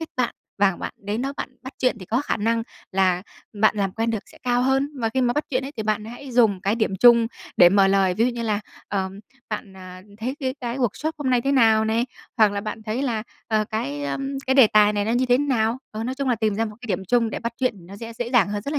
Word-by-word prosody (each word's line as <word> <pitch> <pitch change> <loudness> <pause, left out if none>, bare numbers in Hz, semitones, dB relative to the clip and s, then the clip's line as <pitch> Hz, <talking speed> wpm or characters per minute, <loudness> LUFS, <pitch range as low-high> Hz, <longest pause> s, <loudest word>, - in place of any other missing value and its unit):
kết 325 - -4
bạn. 250 -2 0 0.2
Và 195 -3 +3
bạn - - -6
đến 205 +4 -3
đó 275 +1 -2
bạn - - -4
bắt 260 - -8
chuyện 255 -3 +1
thì 185 - -9
có 235 +4 +1
khả - - -1
năng 230 +2 0 0.3
là 185 -2 +2 0.4
bạn 215 0 +4
làm 195 -2 0
quen 225 +1 -1
được 220 -3 -4
sẽ - - -17
cao 245 0 +1
hơn. 270 +2 +2
Và 225 - +1
khi 260 +4 -1
mà 240 -1 +2
bắt 295 - 0
chuyện 265 -1 0
ấy 280 - -8
thì 220 - -2
bạn 215 0 -1
hãy 245 +3 -9
dùng 220 -6 +4
cái 200 +2 +1
điểm 220 -4 -1
chung 235 +1 +6 0.3
để 175 - +8
mở 195 +1 +4
lời. 195 -2 +3
Ví 225 - +2
dụ - - +1
như 235 -1 -4
là 210 -2 0 0.3
"Ờ, 190 -1 -1 0.4
bạn, 200 -2 -5
à, 185 0 -10 0.2
thấy 250 +5 -3
cái 260 -1 -1
cái 245 +1 -3
workshop 265 +6 -1
hôm 270 -3 -1
nay 250 -1 +3
thế 275 +3 0
nào?" 225 -4 +5
này, 230 +3 +1 0.3
hoặc 215 -3 +5
là 200 - -2
"Bạn 215 +1 -6
thấy 220 +4 -2
là, 230 -6 -1 0.3
ờ, 215 -1 +2
cái, 145 -10 -3
ờ, 140 - -2 0.3
cái 265 - +2
đề 265 -4 +8
tài 210 0 +5
này 205 -1 0
nó 225 - 0
như 255 +1 +2
thế 245 0 +4
nào?" 245 -4 +1
Ờ, 220 +1 -5
nói 255 - -2
chung 275 0 -2
là 245 - +3
tìm 215 -2 0
ra 225 - 0
một 210 -2 -7
cái 245 - -9
điểm 195 -3 -2
chung 235 -2 +2
để - - -3
bắt 235 -1 -3
chuyện 255 -3 0
thì 170 - -15
nó 195 +3 -11
sẽ 230 +1 -7
dễ 240 0 -3
dàng 240 -6 +4
hơn 205 0 -3
rất 280 - -4
là 295 - 0
225 Hz, 290 wpm, -23 LUFS, 205-250 Hz, 0.4 s, để